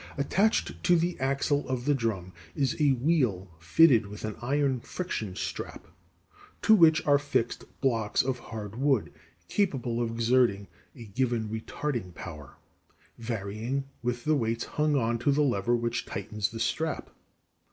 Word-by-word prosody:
Attached 195 +10 +1
to 175 - +5
the 170 +1 +1
axle 140 +2 0
of 130 -1 -2
the 145 - +3
drum 105 -8 -2 0.2
is 135 -3 +1
a 145 -2 +5
wheel 125 - +1
fitted 115 - +5
with 105 +2 -7
an 110 - -4
iron 135 +1 +1
friction 115 - -4
strap - - -5 0.8
(to 220 - +6
which 165 -6 +6
are 145 -1 +5
fixed 145 -5 -1 0.2
blocks 115 -6 +1
of 130 -1 -2
hard 110 -2 -7
wood) 135 -5 +1 0.3
capable 125 - 0
of 115 - 0
exerting 115 -3 +2 0.3
a 120 -4 -10
given 115 0 -1
retarding 110 - -4
power, 75 -4 -9 0.6
varying 115 +3 -3 0.2
with 120 0 -2
the 155 - +2
weights 115 -4 0
hung 150 0 0
on 115 -3 +1
to 140 - +2
the 150 +2 +3
lever 120 -3 +1
which 120 0 -2
tightens 105 0 -3
the 115 0 -7
strap. 155 +7 -2
120 Hz, 150 wpm, -28 LUFS, 110-145 Hz, 0.8 s, to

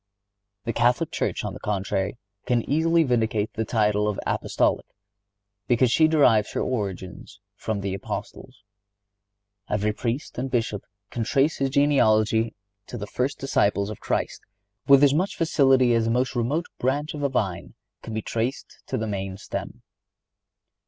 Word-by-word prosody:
The 115 - -2
Catholic 125 +7 +2
Church, - - -2
on - - -4
the - - -9
contrary, 100 +1 -2 0.3
can 120 -2 +1
easily 165 +3 +3
vindicate 110 -5 0
the 110 - -1
title 105 -2 +1
of 105 -2 -2
Apostolic, - - 0 0.8
because 120 0 +3
she 160 +4 +5
derives 125 -9 +3
her - - -1
origin 100 -7 -4 0.3
from 105 -1 -3
the 100 -1 -2
Apostles. 100 +1 -7 1.1
Every 105 +1 0
Priest 120 +4 -3
and 135 +1 -2
Bishop 115 -5 -1 0.3
can 115 - -2
trace 140 +6 +2
his 135 0 0
genealogy 115 -6 +3 0.3
to 120 - -6
the 105 - -5
first 130 +6 -2
disciples 105 -6 +1
of 110 - -8
Christ - - -2 0.5
with 140 0 +7
as 140 -1 +6
much 180 +6 0
facility 135 -6 +4
as 115 -1 +2
the - - 0
most 125 +3 0
remote 140 +9 0
branch 145 +4 -1
of 150 - -6
a 140 - +1
vine 95 -9 -2 0.3
can 110 - -7
be 110 - -2
traced 120 +4 -3
to - - -2
the 110 - -2
main 95 -2 -4
stem. - - -6
115 Hz, 155 wpm, -25 LUFS, 105-135 Hz, 1.1 s, with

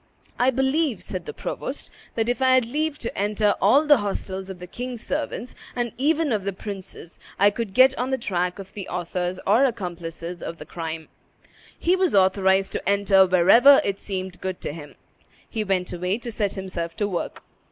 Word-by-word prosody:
"I 250 +2 +4
believe," 265 - +1
said 185 -3 -5
the - - -5
provost, - - -5 0.2
"that 225 -1 0
if 245 +2 -1
I 260 0 +5
had 255 -2 +3
leave 300 +5 -2
to 235 - -5
enter 210 +1 +2
all 290 +3 +5
the 295 -1 +7
hostels 195 -2 -3
of 190 - -7
the 180 - -9
king's 245 +5 -6
servants, 285 -4 -3 0.2
and 240 -2 -1
even 300 +2 +1
of 210 -4 0
the 200 0 -2
princes, 190 -3 -8 0.2
I 205 +1 +5
could 210 -2 -5
get 260 +1 +6
on 250 +1 -1
the 265 - +1
track 180 -5 -1
of 195 -1 -10
the 195 -3 -7
authors 180 +1 -3
or 220 +7 +4
accomplices 175 -7 -3
of 165 - -6
the - - -9
crime." 160 -2 -6 0.7
He 355 +2 +2
was 370 - +1
authorized 190 0 +3
to - - -2
enter 200 -1 +5
wherever 195 +10 +7
it 200 0 -1
seemed 190 -2 -5
good 185 -1 -3
to - - -4
him. 150 -2 -10 0.5
He 220 -2 -2
went 190 -3 -1
away 180 +3 -1
to 235 0 -6
set 205 -3 -1
himself 175 -4 -5
to 205 - 0
work. 185 -4 -4
200 Hz, 195 wpm, -24 LUFS, 185-245 Hz, 0.7 s, the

